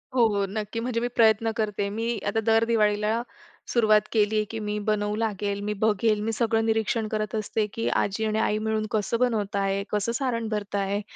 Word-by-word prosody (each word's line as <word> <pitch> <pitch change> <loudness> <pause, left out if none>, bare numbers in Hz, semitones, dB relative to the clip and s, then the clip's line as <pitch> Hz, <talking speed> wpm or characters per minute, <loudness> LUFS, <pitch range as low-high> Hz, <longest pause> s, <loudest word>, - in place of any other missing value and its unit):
हो, 240 -2 +5
हो 200 -2 0
नक्की. 215 +2 -4
म्हणजे 235 0 -1
मी 240 - -1
प्रयत्न 225 -1 +4
करते 210 -2 -1
मी 225 +3 -2
आता 205 +2 +1
दर 225 0 +4
दिवाळीला 215 0 +1 0.5
सुरुवात 215 -3 +4
केली, 215 -1 +2
की 225 - -4
मी 210 -1 -3
बनवू 210 -1 0
लागेल, 205 -2 -2
मी 210 +1 -1
बघेल 215 0 +2
मी 220 +2 -1
सगळं 225 0 +1
निरीक्षण 225 0 0
करत 215 0 -2
असते, 215 0 -1
की 225 - -2 0.2
आजी 210 +3 -2
आणि 215 0 0
आई 210 -1 +1
मिळून 220 0 0
कसं 215 +2 0
बनवत 220 -5 0
आहे, 195 0 0
कसं 210 +2 0
सारण 235 -3 -1
भरत 210 -2 -3
आहे. 200 +1 0
215 Hz, 195 wpm, -26 LUFS, 210-225 Hz, 0.5 s, हो